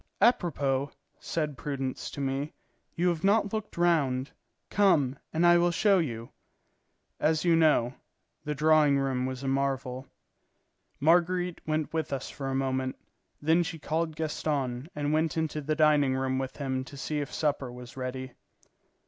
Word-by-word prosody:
"Apropos," 145 - +2 0.3
said 150 -4 -3
Prudence 135 -3 -3
to - - -8
me, 140 +2 -2 0.4
"you 175 +2 +2
have 165 -2 -2
not 205 +1 +3
looked 215 -4 -4
round; 145 -6 +2 0.4
come, 155 -11 +3 0.2
and 165 +2 +2
I 175 0 +7
will 175 0 +3
show 195 +3 +3
you." 115 -8 -3 0.9
As 155 +2 +1
you 170 -1 +5
know, 150 -7 +3 0.5
the 150 -1 -3
drawing 150 -1 +4
room 130 -2 0
was 130 0 -5
a - - -2
marvel. 135 -1 -1 0.9
Marguerite 175 +3 +2
went 155 0 -1
with 160 -2 -2
us 135 -2 -3
for 135 - -5
a 135 - -1
moment; 130 -1 -1 0.5
then 160 +3 +4
she 165 -1 -3
called 160 +1 -2
Gaston 145 -4 -2
and 145 0 -1
went 160 +1 +1
into 155 -1 -1
the 155 +2 -1
dining 150 -4 +4
room 130 0 0
with 130 -1 -5
him 130 -2 -2
to 140 - -11
see 150 +2 -2
if 145 - -4
supper 145 -4 -1
was 125 0 -10
ready. 130 0 -5
145 Hz, 155 wpm, -29 LUFS, 135-160 Hz, 0.9 s, I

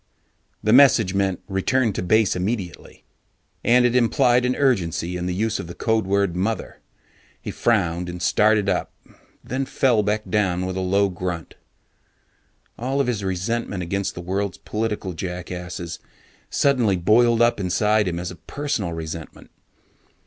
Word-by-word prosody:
The 110 - +3
message 125 -8 +6
meant: 95 -2 0
return 105 +4 +1
to - - -3
base 110 +3 +2
immediately. 95 -2 -4 0.6
And 125 +1 +4
it 125 0 +2
implied 125 0 +3
an 125 0 +1
urgency 90 - 0
in 90 0 -3
the 90 - -1
use 110 +2 -1
of - - -6
the 85 - -9
code 110 -3 0
word 100 -2 +1
Mother. 100 +5 -3 0.6
He - - -6
frowned 90 -6 0
and 90 0 -6
started 105 +2 +3
up, - - -1 0.5
then 130 +2 -3
fell 125 -5 +2
back 105 +1 -1
with 95 -3 0
a - - -2
low 100 +2 +2
grunt. 90 -2 -5 1.3
All 130 +4 -1
of 140 - +2
his 115 -5 -2
resentment 95 +1 -2
against 100 +3 -2
the 90 - -6
world's 95 +2 -2
political 105 -4 -3
jackasses 90 0 -6 0.5
suddenly 125 -9 +2
boiled 115 +6 +4
up 120 -2 +2
inside 105 +3 +1
him 85 -1 -2
as 90 +1 -4
a 90 - -11
personal 110 - -3
resentment. 80 0 -8
100 Hz, 150 wpm, -22 LUFS, 90-115 Hz, 1.3 s, message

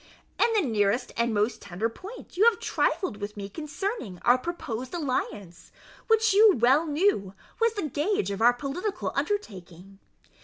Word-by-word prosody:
"In 465 - +4
the 405 -9 +2
nearest 215 +2 0
and 235 0 +1
most 215 +2 0
tender 200 +3 -2
point 380 - -11
you 400 +5 +4
have 470 -1 +5
trifled 370 - -1
with 205 0 -7
me 200 -1 -5
concerning 300 - -5
our 245 - +6
proposed 255 -4 -5
alliance, 210 - -4 0.4
which 445 -2 +3
you 415 0 +7
well 265 +8 +4
knew 290 - +1 0.2
was 460 -1 +2
the 400 -7 -2
gage 295 - -1
of 200 - -4
our 240 +2 +6
political 290 - -4
undertaking. 195 - -4
255 Hz, 155 wpm, -27 LUFS, -, 0.4 s, you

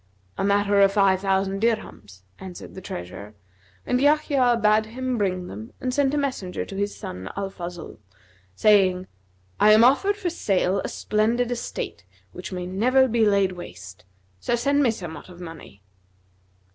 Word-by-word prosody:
'A - - 0
matter 200 0 +3
of 195 0 +5
five 195 -2 +3
thousand 195 0 0
dirhams,' 105 - -2 0.2
answered 185 -2 -9
the 190 - -9
treasurer, 100 - -8 0.5
and 250 - +1
Yahya 280 -5 +3
bade 215 0 +3
him 255 +2 -3
bring 185 -4 -1
them 105 - -9
and 255 -1 -2
sent 275 0 +2
a - - 0
messenger 260 -10 -3
to 195 - -9
his 200 +1 -2
son, 90 +1 -7
Al 195 -1 -3
Fazl, 175 -2 -8 0.6
saying, 190 - +4 0.5
'I 215 0 +7
am 220 +2 +6
offered 390 +11 +4
for 370 -5 -2
sale 195 - 0
a - - -2
splendid 230 +3 0
estate 240 - -5 0.3
which - - -8
may 180 -1 -4
never 250 +9 +3
be 230 -2 +2
laid 200 -2 +3
waste; 95 - -10 0.4
so 240 - 0
send 280 +4 +1
me 265 - +4
somewhat 175 -7 -6
of 180 -1 -13
money.' 165 - -11
200 Hz, 160 wpm, -24 LUFS, 180-240 Hz, 0.6 s, I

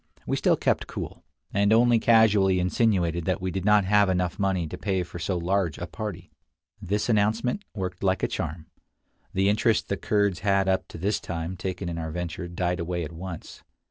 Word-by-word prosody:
We - - 0
still - - +2
kept - - 0
cool, - - -7 0.3
and 100 +1 +3
only 120 +1 +5
casually 105 -5 +4
insinuated 90 -3 +1
that 95 -2 0
we 95 0 -3
did 95 +1 -3
not 105 -2 +5
have 100 0 +4
enough 90 -2 -1
money 95 -3 +1
to 75 - -6
pay 95 -3 -1
for 85 0 -9
so 90 +2 -1
large 90 -2 0
a 90 - -4
party. 105 -1 -6 0.5
This 105 +3 -1
announcement 115 - +1
worked 90 -3 -4
like 95 -1 +1
a - - +3
charm. 80 +1 -4 0.7
The 95 +1 +3
interest 110 +2 +2
the 100 - 0
Kurds 100 -3 +1
had 100 -1 +2
up 95 0 +1
to - - -10
this 100 +5 0
time 85 +1 -4
taken 95 0 -4
in 85 -1 -3
our 80 -1 -4
venture 85 +2 -4
died 90 +1 -2
away 85 +1 -2
at 75 - -6
once. 85 0 -8
95 Hz, 195 wpm, -26 LUFS, 85-105 Hz, 0.7 s, only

